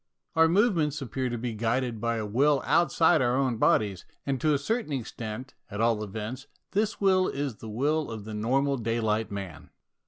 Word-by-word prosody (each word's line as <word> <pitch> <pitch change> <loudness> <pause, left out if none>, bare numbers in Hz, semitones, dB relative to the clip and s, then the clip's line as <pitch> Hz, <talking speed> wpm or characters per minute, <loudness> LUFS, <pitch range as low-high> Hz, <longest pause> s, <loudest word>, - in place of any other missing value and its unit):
Our 160 0 +6
movements 165 - +2
appear 130 -1 -3
to 120 - -3
be 120 0 -3
guided 115 +1 -1
by 115 0 0
a 110 - -2
will 135 +7 +2
outside 165 -2 +4
our 125 0 +2
own 130 -4 +1
bodies, 100 -4 +2 0.2
and 135 -3 -1
to 155 - +3
a 145 - +3
certain 220 - -2
extent, 120 -1 -5 0.2
at 105 -2 -6
all 115 -2 +2
events, 110 +6 -6 0.2
this 210 +2 0
will 190 -2 +3
is 140 -5 -3
the 110 - -9
will 145 +7 0
of 110 -3 -6
the 110 - -6
normal 135 +6 +1
daylight 110 -1 0
man. 95 -7 -7
125 Hz, 185 wpm, -28 LUFS, 110-145 Hz, 0.2 s, Our